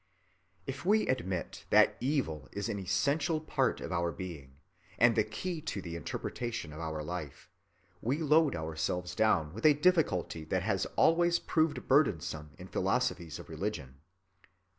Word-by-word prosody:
If 135 +1 -5
we 215 +4 +3
admit 95 -9 -2
that - - +5
evil 125 - -1
is 100 +3 -3
an 105 -2 -2
essential 145 - +1
part 145 -4 0
of - - -6
our 85 -1 0
being 75 -6 -8 0.4
and 120 -1 +5
the 110 - +4
key 155 - -4
to 150 -9 -4
the 85 -3 -6
interpretation 115 0 -4
of 75 - -9
our 80 -2 -3
life, 75 -3 -6 0.5
we 130 +5 0
load 155 -1 +3
ourselves 80 +3 -3
down 90 -7 +2
with 110 - -8
a 150 -2 +7
difficulty 145 - +2
that - - -1
has - - 0
always 170 +1 +4
proved 160 -3 0
burdensome 85 - +2
in - - -10
philosophies 85 -3 -1
of - - -10
religion. 70 -10 -5
105 Hz, 150 wpm, -31 LUFS, -, 0.5 s, a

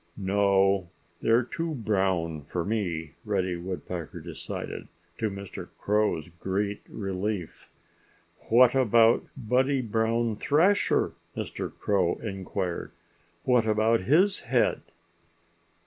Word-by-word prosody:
"No! 100 -2 +2 0.3
They're 115 +2 +4
too 165 +5 -3
brown 95 - 0
for 85 +4 -4
me," 85 -9 -2
Reddy 95 -5 0
Woodpecker 90 -2 -5
decided, - - -6 0.3
to 110 - 0
Mr. 100 -1 -7
Crow's 105 -5 +1
great 100 +2 -2
relief. 95 -2 -4 0.8
"What 120 +2 +6
about 115 -3 +4
Buddy 130 +2 +1
Brown 115 0 0
Thrasher?" 170 - +3 0.3
Mr. - - -4
Crow 95 -4 +1
inquired. 95 -3 -4 0.5
"What 125 -3 +3
about 110 +1 +3
his 180 - +3
head?" - - +1
105 Hz, 100 wpm, -27 LUFS, 95-115 Hz, 0.8 s, What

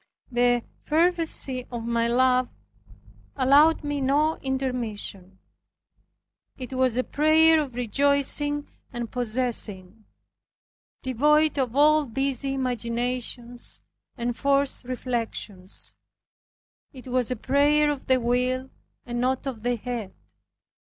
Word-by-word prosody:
The 245 -1 +2 0.2
fervency 320 -6 +1
of 235 -2 -5
my 235 0 0
love 255 +1 +2 0.9
allowed 290 +5 +4
me 290 -1 -2
no 295 +4 +2
intermission. 235 -8 -4 1.2
It 255 0 -7
was 255 -2 +1
a 255 - +2
prayer 315 +2 +4
of 265 -5 -6
rejoicing 280 +4 +1 0.2
and 240 -2 -5
possessing, 220 -5 -1 1.0
devoid 295 +4 +2
of 255 -2 -1
all 300 +1 +4
busy 270 +2 -1
imaginations 245 -1 -3 0.4
and 240 0 -2
forced 280 -1 0
reflections; 230 -6 -4 1.0
it 260 -3 -13
was 250 -2 0
a 255 - -1
prayer 290 +5 +2
of 285 -2 -6
the 260 -1 +4
will, 250 +2 -1 0.3
and 240 -1 -3
not 260 +2 0
of 255 -5 -5
the 245 +2 0
head. 230 -4 -6
255 Hz, 105 wpm, -25 LUFS, 240-280 Hz, 1.2 s, allowed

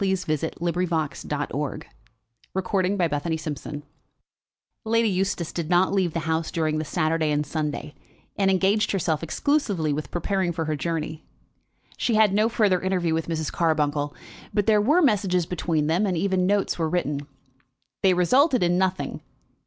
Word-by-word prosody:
CHAPTER 180 -5 0
LXXV 170 -4 -1 0.2
Lord 145 0 -3 0.7
George 190 0 +1
Gives 180 -5 0
His 160 -1 -3
Reasons 145 +1 -7 1.0
Lady 230 +1 +2
Eustace 185 -3 -1
did 165 -2 -3
not 180 +2 +3
leave 185 -5 +1
the 165 - -1
house 160 0 -1
during 155 -2 0
the - - -1
Saturday 160 0 0
and 150 0 0
Sunday, 150 -1 -3 0.4
and 195 -1 +2
engaged 195 +3 +2
herself 160 -5 0
exclusively 185 - 0
with 150 +1 -4
preparing 185 +1 -1
for 165 0 -2
her 155 0 -1
journey. 155 0 -3 0.7
She 235 - +1
had 215 -2 +4
no 215 +2 +3
further 205 -6 +2
interview 180 -3 0
with 160 0 -1
Mrs. 160 -2 -2
Carbuncle, 150 -3 0 0.4
but 205 -2 +1
there 210 0 +4
were 300 +11 +4
messages 195 - +2
between 165 -3 -1
them, 175 +7 +1
and 180 -3 0
even 185 0 +1
notes 200 -2 +1
were 160 -1 +1
written. 150 -4 -2 0.7
They 190 -2 +4
resulted 255 - +3
in 175 +1 +2
nothing. 185 0 -1
175 Hz, 155 wpm, -25 LUFS, 155-195 Hz, 1.0 s, had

